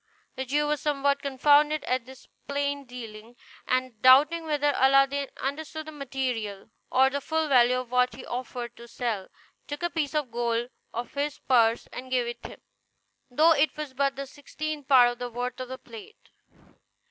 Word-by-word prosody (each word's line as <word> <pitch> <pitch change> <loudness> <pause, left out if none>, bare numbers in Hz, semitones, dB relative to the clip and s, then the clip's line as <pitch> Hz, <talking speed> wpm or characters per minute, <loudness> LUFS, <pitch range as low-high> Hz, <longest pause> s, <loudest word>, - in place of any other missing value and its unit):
The 265 - -4
Jew 295 +3 +1
was 295 0 -1
somewhat 280 -1 +1
confounded 290 +2 +3
at 255 -1 -1
this 265 -1 -14 0.2
plain 285 0 -2
dealing; 230 -2 -10 0.3
and 255 -3 -1
doubting 295 +6 +6
whether 290 -2 +1
Aladdin 275 +1 +3
understood 310 +3 -4
the 310 - -8
material 250 -8 -4 0.2
or 265 +1 +4
the 280 +1 -2
full 320 +2 -1
value 250 -2 +5
of 255 -1 -5
what 250 -2 +2
he 255 - -10
offered 245 -1 -5
to 235 - -12
sell, 230 -5 -3 0.4
took 290 +2 -6
a 345 - 0
piece 300 -3 -2
of 295 -5 -1
gold 235 +1 -1 0.2
out 240 +1 -3
of - - -25
his 290 +1 -2
purse 230 -3 +2
and 255 +1 -7
gave 250 -2 +1
it 235 0 -6
him, - - -9 0.7
though 310 +6 +4
it 300 0 +1
was 300 -3 -5
but 275 +1 0
the 275 +1 -5
sixtieth 290 +1 -6
part 250 -3 +6
of 240 - -10
the 245 - -4
worth 245 +1 -4
of 255 -1 -6
the 260 - -6
plate. 430 - -14
265 Hz, 180 wpm, -27 LUFS, 245-290 Hz, 0.7 s, doubting